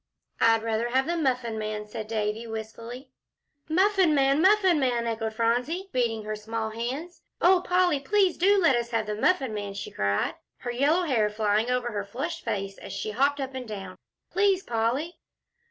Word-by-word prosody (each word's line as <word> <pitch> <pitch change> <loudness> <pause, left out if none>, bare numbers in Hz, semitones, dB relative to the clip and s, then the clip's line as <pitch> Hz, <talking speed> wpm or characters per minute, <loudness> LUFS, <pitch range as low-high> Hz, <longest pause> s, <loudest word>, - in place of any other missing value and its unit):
"I'd 225 -1 +4
rather 225 +1 -1
have 260 +2 +2
the 340 - -1
Muffin 250 -7 -1
Man," 215 0 -4
said 215 +1 -7
Davie, 215 +1 -2
wistfully. 230 +4 -7 0.6
"Muffin 375 -1 +3
Man 275 +2 +3
Muffin 380 -3 +5
Man," 245 -3 +1
echoed 225 -1 -2
Phronsie, 250 - 0
beating 230 -3 0
her 215 0 -3
small 220 +1 -4
hands. 260 +10 -5 0.2
"Oh, 360 +1 +5
Polly, 360 -5 +2
please 380 +5 +2
do 400 +3 +4
let 330 -8 +4
us 235 0 -1
have 225 -2 0
the 210 - -3
Muffin 265 +1 +1
Man," 205 -1 -4
she 200 - -6
cried, 100 0 0 0.3
her 245 - -3
yellow 290 +9 +2
hair 235 -10 +2
flying 210 +2 +1
over 250 -1 0
her 205 -2 -3
flushed 270 +12 -5
face 195 -1 -3
as - - -9
she 215 - -3
hopped 280 +6 +1
up 265 -1 -4
and 255 -2 -6
down. 195 -3 -7 0.4
"Please, 390 0 +2
Polly!" 240 +9 -1
240 Hz, 180 wpm, -27 LUFS, 220-315 Hz, 0.6 s, Muffin